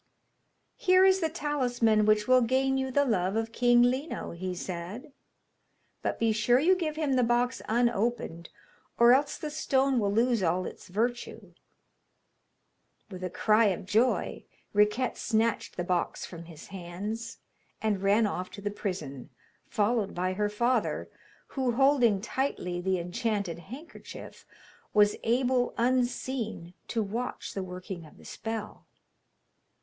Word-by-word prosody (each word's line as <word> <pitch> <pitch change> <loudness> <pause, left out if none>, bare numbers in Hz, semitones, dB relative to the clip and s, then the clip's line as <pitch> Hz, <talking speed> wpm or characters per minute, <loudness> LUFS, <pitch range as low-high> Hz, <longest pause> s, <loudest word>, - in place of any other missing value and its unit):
'Here 370 0 +5
is 380 0 +5
the 325 -3 0
talisman 245 -9 +1
which 215 0 +3
will 255 0 +6
gain 265 +3 +2
you 265 0 -1
the 285 +2 +2
love 195 -5 0
of 225 0 -1
King 240 0 +4
Lino,' 260 +6 -1
he 180 +2 -4
said; 190 - -6 0.9
'but - - -2
be 230 -1 +2
sure 215 +3 +3
you 345 +8 +4
give 320 -4 -2
him 305 -3 0
the 255 -1 +3
box 240 +2 +1
unopened, 225 -7 0 0.5
or 235 +1 +7
else 280 +2 +1
the 305 - -5
stone 270 -3 +1
will 200 -2 +1
lose 230 +1 +2
all 180 +1 +1
its - - -9
virtue.' 235 +6 -3 1.6
With 185 -1 -8
a 185 - -2
cry 215 +5 +3
of 190 -3 0
joy 225 +6 +1 0.3
Riquette 210 +5 +2
snatched 225 -1 0
the 175 - -1
box 175 -1 -1
from 170 -1 -10
his 165 -2 -12
hands, 200 +5 -6 0.4
and 210 -3 0
ran 205 +3 +3
off 185 -3 -3
to 200 - -8
the 205 0 -2
prison, 155 -10 -5 0.4
followed 210 -1 0
by 185 +1 -1
her 210 +2 0
father, 235 +2 0 0.4
who, 260 -3 -1
holding 245 -6 +4
tightly 205 -8 -2
the 190 +1 0
enchanted 180 0 -2
handkerchief, 255 - -11 0.5
was 210 0 +5
able, 245 +1 +1
unseen, 240 -6 -1
to 225 -2 -1
watch 230 +5 -4
the 195 - -3
working 180 -2 -7
of - - -18
the - - -16
spell. 225 -1 -6
225 Hz, 145 wpm, -29 LUFS, 190-255 Hz, 1.6 s, or